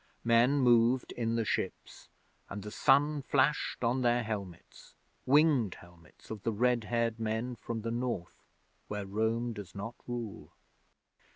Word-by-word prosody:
Men 120 +4 +4
moved 120 -1 +3
in 115 -1 -1
the 115 -1 0
ships, - - -4 0.4
and 100 0 -6
the 105 - -7
sun 145 +4 +3
flashed 135 0 +1
on 120 +3 +1
their 120 0 +2
helmets 100 -6 -7 0.3
winged 140 - +4
helmets 85 +1 -17
of 110 -2 -6
the 115 - -1
red 120 +1 +1
haired 115 -1 0
men 110 +3 -2
from 115 0 -5
the 115 - -2
North 120 -7 -3 0.5
where 105 -1 -4
Rome 110 +4 -1
does 105 -3 -9
not 100 +4 -5
rule. 120 -4 -6
115 Hz, 145 wpm, -31 LUFS, 105-125 Hz, 0.5 s, Men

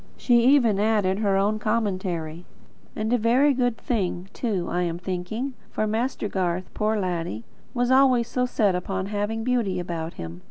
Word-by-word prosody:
She 240 -2 +3
even 240 -8 +4
added 205 -3 +2
her 200 -3 +2
own 210 +2 +1
commentary: 185 -7 -2 0.5
"And 220 +2 -1
a 245 - +3
very 255 +6 +4
good 245 -3 0
thing, 190 -5 -2
too, 195 -8 -2
I 175 - -1
am 170 -1 -1
thinking. 190 +9 -4 0.2
For 215 - -1
Master 225 +1 -1
Garth, 185 -2 -2
poor 215 0 0
laddie, 170 - -3 0.3
was 245 +1 +1
always 260 -3 +4
so 250 -1 0
set 210 -5 +2
upon 190 +1 -2
having 210 +2 -2
beauty 230 -7 0
about 170 -2 -4
him. 85 +1 -7
210 Hz, 165 wpm, -25 LUFS, 180-235 Hz, 0.5 s, even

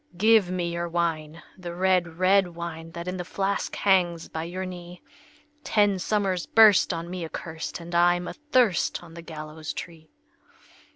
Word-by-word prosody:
"Give 215 -1 +4
me 175 -2 -2
your 170 0 -3
wine, 165 -1 -2 0.2
the 175 -1 -7
red, 180 -3 +1
red 185 -1 +3
wine, 165 -1 -6
That 170 +1 -7
in 180 0 -3
the 180 - -3
flask 195 +2 -2
hangs 175 -4 +1
by 160 0 -4
your 185 +2 -5
knee! 175 -1 -9 0.6
Ten 205 -3 +2
summers 190 -2 -1
burst 215 -3 +6
on 165 -1 -4
me 180 0 -5
accurst, 160 +1 -6
And 170 +1 -9
I'm 175 +1 +3
athirst 250 - +1
on 165 -1 -13
the 170 - -9
gallows 155 -1 -7
tree." 160 -2 -9
175 Hz, 160 wpm, -26 LUFS, 170-185 Hz, 0.6 s, burst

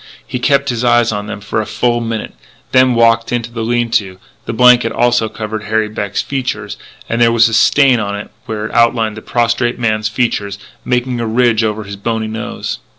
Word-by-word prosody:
He 125 - -4
kept 140 +1 +2
his 120 -1 -2
eyes 120 -1 +3
on 105 -1 -4
them 105 - -6
for 105 +2 -2
a 105 - -6
full 120 +3 0
minute, 115 -2 -4 0.4
then 130 -1 +4
walked 115 0 +3
into 120 -1 -2
the 115 -1 -5
lean 120 0 0
to. 95 -5 0 0.3
The - - -1
blanket 125 -1 +5
also 120 -1 +1
covered 110 -1 -5
Harry 110 0 0
Beck's 105 -1 -3
features 135 -2 -4 0.3
and 115 +1 -1
there 115 0 +5
was 115 0 +5
a 115 - -4
stain 130 +2 +4
on 100 -1 -3
it 105 - -8 0.2
where 105 -1 -4
it - - -7
outlined 115 -2 +2
the 110 - -8
prostrate 120 +1 0
man's 110 -2 0
features, 105 -4 -1 0.3
making 125 0 -1
a 115 - -2
ridge 115 0 +2
over 110 0 -2
the 100 0 -8
bony 110 +2 -2
nose. 110 0 -5
115 Hz, 205 wpm, -15 LUFS, 110-120 Hz, 0.4 s, blanket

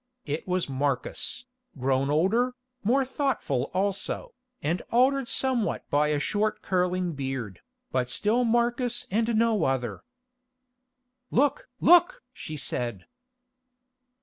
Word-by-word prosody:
It 150 +4 -3
was 180 -1 0
Marcus, 140 - -2 0.3
grown 135 +1 +1
older, 220 - +2 0.3
more 260 +6 +3
thoughtful 255 - -1
also, 200 - -1 0.3
and 165 +5 -1
altered 260 +2 +3
somewhat 255 -4 0
by 150 +1 +3
a 150 -1 +1
short 215 +7 -1
curling 180 -1 0
beard, 130 - -4 0.3
but 125 -1 0
still 220 - +2
Marcus 240 +1 +1
and 225 +2 +1
no 225 -2 +3
other. 125 -5 -1 1.3
"Look! 285 +1 +1
look!" 350 +1 +5
she 155 - -7
said. 120 -3 -3
195 Hz, 110 wpm, -27 LUFS, -, 1.3 s, look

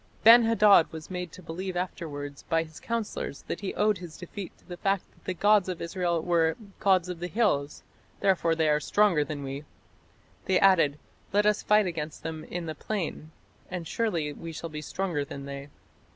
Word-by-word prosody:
Ben 230 +1 +9
hadad 210 -6 +6
was 160 +2 -9
made 180 -2 -4
to 185 - -12
believe 180 +3 -4
afterwards 145 -6 -5
by 165 0 +2
his 160 -1 -12
counsellors 230 -10 -4
that - - -4
he 200 - -4
owed 210 -2 +2
his 175 -3 -9
defeat 185 +1 -7
to - - -27
the 175 -1 -7
fact 195 0 +1
that - - -27
the 185 - -2
gods 205 0 +4
of 180 - -3
Israel 170 -1 -1
were 165 -2 +2 0.2
"gods 185 -3 +3
of 180 -2 -5
the 175 - -3
hills; 180 -10 0 0.4
therefore 180 -4 +2
they 160 -1 +2
are 150 0 +3
stronger 190 -2 +3
than 145 -1 -5
we". 135 +2 -5 0.8
They 190 -1 +3
added: 165 -7 +5 0.3
"Let 205 +1 +3
us 210 0 +3
fight 210 0 +4
against 160 -4 -4
them 160 -1 -5
in 175 -1 -5
the 160 - -4
plain, 165 -3 -4 0.4
and 180 -3 -5
surely 170 -10 -1
we 165 +3 -7
shall 165 +1 -6
be 150 0 -5
stronger 170 -1 -2
than 140 0 -8
they". 140 0 -7
175 Hz, 195 wpm, -28 LUFS, 155-195 Hz, 0.8 s, Ben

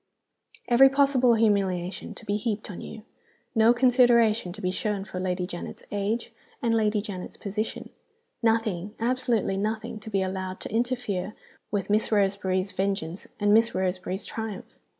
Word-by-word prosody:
Every 260 +3 +7
possible 270 -3 +4
humiliation 195 -5 0
to - - -12
be 205 -1 0
heaped 210 -1 -2
on 180 - -8
you; 220 - -9 0.5
no 225 +1 +5
consideration 240 -5 +4
to 205 - -10
be 185 -3 -1
shown 200 0 -2
for 185 - -6
Lady 180 -1 -1
Janet's 175 -1 -7
age 205 +3 -2 0.3
and 235 -4 +1
Lady 215 -2 +2
Janet's 190 -4 -6
position; 215 +2 -4 0.5
nothing, 220 -4 0
absolutely 235 -4 0
nothing, 215 +2 -2
to 220 - -9
be 195 -2 +1
allowed 185 0 -4
to - - -6
interfere 225 -5 -1 0.3
with 205 -1 -2
Miss 215 +2 +2
Roseberry's 195 -2 +1
vengeance 190 -3 -2
and 205 0 +3
Miss 230 +1 +4
Roseberry's 185 +1 -2
triumph! 220 -3 -6
210 Hz, 150 wpm, -26 LUFS, 190-230 Hz, 0.5 s, Every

